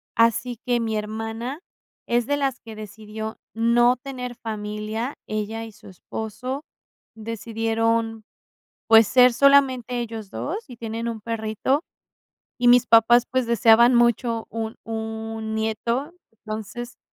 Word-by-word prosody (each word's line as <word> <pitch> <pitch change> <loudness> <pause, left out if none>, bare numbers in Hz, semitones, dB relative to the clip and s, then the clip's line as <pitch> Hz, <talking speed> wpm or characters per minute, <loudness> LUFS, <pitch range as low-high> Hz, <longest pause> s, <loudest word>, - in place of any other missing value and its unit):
Así 230 +1 +2
que 240 -1 +2
mi 220 -1 -1
hermana 225 +6 -4 0.5
es 240 0 +1
de 285 0 +1
las 270 -3 -1
que 225 -2 -11
decidió 215 +1 -7 0.2
no 240 +2 +4
tener 250 -2 -6
familia, 215 +3 -4
ella 215 +1 -3
y 225 - -10
su 210 0 -17
esposo 225 +8 -6 0.5
decidieron, 225 0 -1 0.7
pues, 225 -1 +8
ser 250 -1 +6
solamente 260 -3 +4
ellos 225 -3 -6
2 365 +3 -5
y 245 - -10
tienen 230 0 -4
un 225 -2 -5
perrito. 230 +6 -1 0.8
Y 245 0 +2
mis 245 0 +6
papás, 235 +1 +6
pues, 255 -1 +1
deseaban 235 +1 +5
mucho 235 -1 +2
un 225 -1 -4
un 220 0 -5
nieto, 230 +7 -2 0.2
entonces, 220 +3 -7
230 Hz, 125 wpm, -23 LUFS, 220-245 Hz, 0.8 s, pues